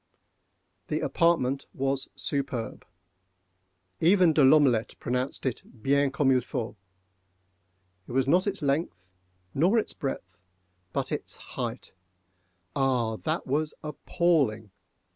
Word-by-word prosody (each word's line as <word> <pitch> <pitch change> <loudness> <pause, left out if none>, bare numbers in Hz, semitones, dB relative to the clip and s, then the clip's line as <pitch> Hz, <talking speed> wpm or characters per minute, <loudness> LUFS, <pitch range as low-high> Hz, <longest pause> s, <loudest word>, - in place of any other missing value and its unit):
The - - -1
apartment 140 -6 +1
was 135 0 -1
superb. 140 -5 -3 1.1
Even 180 -1 +5
De 150 - +4
L'Omelette 130 -5 +4
pronounced 125 +3 -2
it 130 - -1 0.2
bien 140 +1 +3
comme 140 0 +2
il 130 -1 +4
faut. 120 -3 -4 1.3
It - - -9
was 135 0 +2
not 180 +7 +3
its 195 -5 -2
length 140 - -1 0.5
nor 180 +10 +3
its 220 - 0
breadth,—but 90 - -6
its - - -2 0.2
height—ah, 95 +6 -4
that 160 +6 -2
was 150 +3 -1
appalling! 150 - 0
135 Hz, 105 wpm, -28 LUFS, 110-150 Hz, 1.3 s, Even